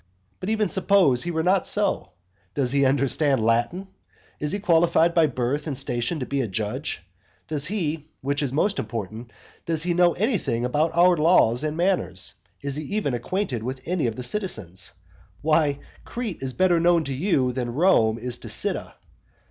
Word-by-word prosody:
But 185 - -4
even 215 -1 +1
suppose 185 -9 +3
he 175 - -4
were 160 -1 -1
not 185 +2 +2
so. 200 - 0 0.5
Does 130 -4 0
he 140 0 +3
understand 135 -2 +2
Latin? 120 +12 0 0.5
Is 150 - -2
he 200 - 0
qualified 170 -3 +3
by 165 -2 +4
birth 135 +3 -2
and 140 -4 -2
station 130 +3 -2
to - - -2
be 140 +1 -1
a 120 - -2
judge? 105 +2 -3 0.4
Does 150 -1 0
he 165 -6 -3
which 140 +2 -1
is 140 -3 -1
most 195 +9 +1
important 110 +1 -5 0.4
does 165 -2 0
he 175 0 0
know 175 0 +4
anything 185 - -1
about 155 +6 0
our 180 +1 +6
laws 150 -6 +4
and 155 0 -2
manners? 180 +1 +1 0.3
Is 140 0 -2
he 155 - -4
even 205 -11 0
acquainted 125 - -2
with 130 +3 -6
any 175 -6 0
of 115 - -3
the 125 - -5
citizens? 105 - -2 0.5
Why, 155 -2 +2 0.3
Crete 235 -6 -5
is 130 -1 -3
better 180 0 +3
known 170 -1 +3
to 140 - -4
you 135 -4 +1
than 120 -1 -3
Rome 135 -10 +3
is 120 +1 -5
to - - -8
Cyda. - - -1
150 Hz, 180 wpm, -24 LUFS, 125-175 Hz, 0.5 s, our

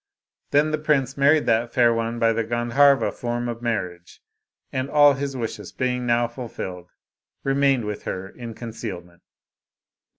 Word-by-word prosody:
Then 150 +2 +3
the 155 - -1
prince 145 -3 +1
married 145 +2 +4
that 115 +1 +1
fair 120 -2 +5
one 115 +1 -2
by 115 -1 +3
the 115 +1 0
Gandharva 120 +5 +3
form 120 0 -3
of 120 -1 -5
marriage, 90 -7 -4 0.5
and 130 +1 -2
all 145 -1 +6
his 135 0 -4
wishes 110 -4 -5
being 125 -1 -2
now 120 0 +2
fulfilled, 95 -7 -7 0.5
remained 135 -3 +2
with 105 0 -4
her 95 +1 -4
in 115 +2 -9
concealment. 100 -7 -8
120 Hz, 145 wpm, -23 LUFS, 115-135 Hz, 0.5 s, all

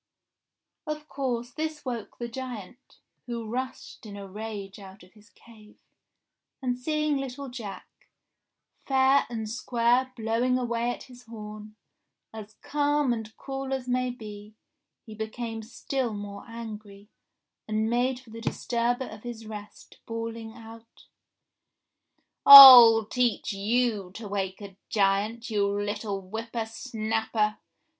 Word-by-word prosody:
Of 305 0 -5
course 245 -4 -3
this 310 +2 -5
woke 235 -4 -5
the 240 - -4
giant, 245 -1 -9 0.3
who 235 -2 -5
rushed 255 +3 -6
in 205 -1 -9
a 200 -1 -8
rage 205 -1 -7
out 190 -1 -13
of 180 - -20
his 210 0 -21
cave, 215 -2 -19 0.8
and 250 -2 -1
seeing 305 +3 -1
little 270 0 -6
Jack, 230 -6 -10 0.8
fair 270 0 +3
and 225 -2 -4
square 240 +2 +1
blowing 230 +3 0
away 235 -1 -1
at 245 - -5
his 250 -1 -15
horn, 215 -1 -10 0.6
as 215 -1 -10
calm 290 -3 +1
and 220 -1 -7
cool 270 0 -5
as 260 -2 -4
may 255 0 0
be, 210 -3 -10 0.5
he 220 - -10
became 225 +1 -5
still 240 +1 -3
more 205 0 -8
angry, 215 -3 -10 0.6
and 215 0 0
made 245 +2 0
for 255 -4 -17
the 230 +1 -9
disturber 240 +2 -1
of 215 -3 -10
his 235 -2 -8
rest 210 -1 -11
bawl 230 0 -4
ing 225 -1 -8
out, 230 0 -14 1.4
*'ril 245 -5 +12
teach 240 -1 0
you 210 -1 0
to 220 -2 -7
wake 195 -1 -3
a 195 -2 -10
giant, 210 +3 0
you 205 -2 +1
little 205 0 -3
whipper 225 +4 -5
snapper. 220 -2 -2
230 Hz, 130 wpm, -27 LUFS, 215-250 Hz, 1.4 s, ril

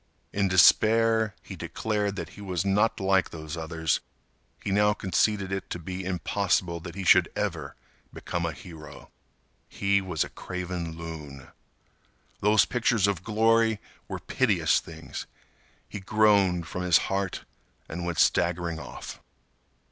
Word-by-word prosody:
In 100 -1 +1
despair, 110 +4 +4
he - - -8
declared 105 -2 -2
that - - -5
he - - -13
was 95 -2 -2
not 105 +3 +2
like 95 -1 +2
those 80 0 -7
others. 80 -1 -1 0.6
He 100 - -2
now 105 +1 +4
conceded 100 0 0
it 95 0 -4
to - - -3
be 90 +2 -6
impossible 90 -1 0
that 85 0 -9
he 100 - -4
should 90 - +5
ever - - -3 0.4
become 85 - -4
a 85 - -1
hero. 75 -1 -12 0.6
He 100 0 +1
was 90 -5 -1
a - - -8
craven 90 -2 -5
loon. 75 -5 -8 0.9
Those 105 +1 +4
pictures 115 -4 +1
of 100 -4 -1
glory 115 +1 +3 0.3
were - - -4
piteous - - +2
things. 80 0 -8 0.6
He 105 - -7
groaned 100 -4 +3
from 90 +1 -5
his 90 -2 +5
heart 95 -1 -2 0.4
and 85 +2 -5
went 85 -2 -3
staggering 85 0 +2
off. 75 - -8
95 Hz, 140 wpm, -27 LUFS, 85-105 Hz, 0.9 s, should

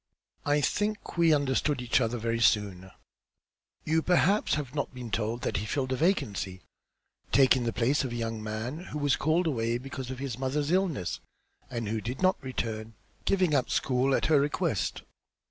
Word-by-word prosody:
I 145 +1 +3
think 210 +8 -1
we 170 -2 +4
understood 140 -1 +1
each 125 +1 +2
other 120 0 0
very 115 0 -1
soon. 100 -4 +2 1.0
You 160 +1 +2
perhaps 180 +5 +3
have 145 -4 -4
not 145 - -2
been 125 -3 -7
told 115 +3 -1
that - - 0
he 105 - -3
filled 130 +2 -1
a - - +1
vacancy, 100 - -1 0.7
taking 130 -2 +5
the 115 - 0
place 130 +6 +1
of 130 - -3
a - - -4
young 115 -1 -3
man 110 +7 -4
who 150 - -6
was 145 -2 +2
called 160 +4 +1
away 115 -6 0
because 130 0 -7
of 130 - -5
his 130 -3 -5
mother's 140 +3 -1
illness, 175 - 0 0.5
and 115 -4 -3
who 110 +1 -2
did 125 +4 -5
not 185 0 +2
return, 110 -4 -4 0.3
giving 185 -5 +2
up 135 -3 +3
the - - -4
school 130 +1 +2
at - - +1
her 155 -3 +5
request. 145 +1 -1
130 Hz, 180 wpm, -29 LUFS, 115-150 Hz, 1.0 s, taking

